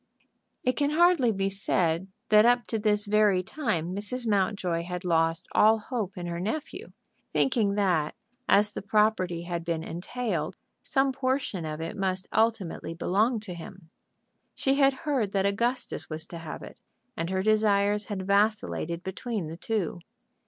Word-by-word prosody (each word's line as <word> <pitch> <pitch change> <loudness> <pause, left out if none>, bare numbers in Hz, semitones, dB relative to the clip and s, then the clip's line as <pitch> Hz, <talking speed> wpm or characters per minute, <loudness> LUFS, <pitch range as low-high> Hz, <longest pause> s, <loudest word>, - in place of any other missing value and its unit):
It 255 - +3
can 285 +4 0
hardly 325 -6 +4
be 195 -2 0
said 185 -2 0 0.2
that 215 0 +7
up 245 +1 +4
to 225 - -1
this 210 0 +1
very 205 -3 +3
time 185 - -2
Mrs. 230 +5 -3
Mountjoy 190 -4 +1
had 180 +1 -5
lost 165 0 +1
all 220 +1 +5
hope 215 -4 -4
in 175 - -4
her 170 0 -3
nephew, 225 - -4 0.4
thinking 220 -7 +2
that 180 -7 +1 0.3
as 210 +1 +5
the - - -5
property 200 -4 +1
had 170 -1 -4
been 165 -1 -2
entailed 175 -1 -3 0.2
some 270 -1 +1
portion 260 - -1
of 155 0 -4
it 165 +6 -4
must 190 -2 -1
ultimately 220 -7 0
belong 215 +7 +1
to 200 -4 -6
him. 170 0 -11 0.6
She 270 - +1
had 275 -1 +4
heard 255 -10 0
that 195 -1 +2
Augustus 235 +6 -1
was 160 0 -4
to 170 - -7
have 165 -2 -7
it, - - -11 0.4
and 165 -4 -3
her 190 0 0
desires 210 -1 +3
had 195 -3 -4
vacillated 200 -4 +1
between 190 -2 -4
the 165 - -7
two. 195 -3 -2
200 Hz, 160 wpm, -27 LUFS, 175-225 Hz, 0.6 s, that